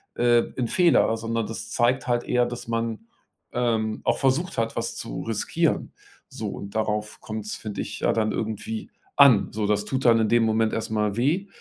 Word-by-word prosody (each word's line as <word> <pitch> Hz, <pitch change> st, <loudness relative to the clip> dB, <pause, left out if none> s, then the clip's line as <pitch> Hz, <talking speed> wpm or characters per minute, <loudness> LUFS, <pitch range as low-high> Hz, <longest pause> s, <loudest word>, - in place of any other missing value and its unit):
äh, 120 Hz, -1 st, +4 dB
'n 125 Hz, -, 0 dB
Fehler, 170 Hz, -8 st, +4 dB
sondern 115 Hz, 0 st, -2 dB
das 110 Hz, +1 st, -6 dB
zeigt 125 Hz, +3 st, +1 dB
halt 120 Hz, -1 st, +1 dB
eher, 125 Hz, 0 st, +2 dB
dass 120 Hz, -1 st, -7 dB
man, 115 Hz, -1 st, -3 dB, 0.5 s
ähm, 110 Hz, -3 st, 0 dB
auch -, -, +1 dB
versucht 140 Hz, +7 st, 0 dB
hat, 115 Hz, 0 st, -1 dB
was -, -, -3 dB
zu -, -, -5 dB
riskieren. -, -, -1 dB, 0.3 s
So, -, -, -5 dB
und 100 Hz, +1 st, -8 dB
darauf 105 Hz, -1 st, -2 dB
kommt's, 110 Hz, -1 st, -5 dB
finde 105 Hz, -2 st, -5 dB
ich, -, -, -6 dB
ja -, -, +3 dB
dann 110 Hz, -1 st, +1 dB
irgendwie 110 Hz, 0 st, -4 dB, 0.3 s
an. 140 Hz, -8 st, +6 dB
So, 105 Hz, -1 st, -1 dB
das 105 Hz, 0 st, +1 dB
tut 130 Hz, +3 st, -2 dB
dann 115 Hz, -1 st, +6 dB
in 110 Hz, -, +2 dB
dem 120 Hz, +1 st, +3 dB
Moment 110 Hz, 0 st, +1 dB
erst 110 Hz, 0 st, -3 dB
mal 105 Hz, -2 st, 0 dB
weh 155 Hz, +11 st, +1 dB
115 Hz, 190 wpm, -25 LUFS, 110-120 Hz, 0.5 s, an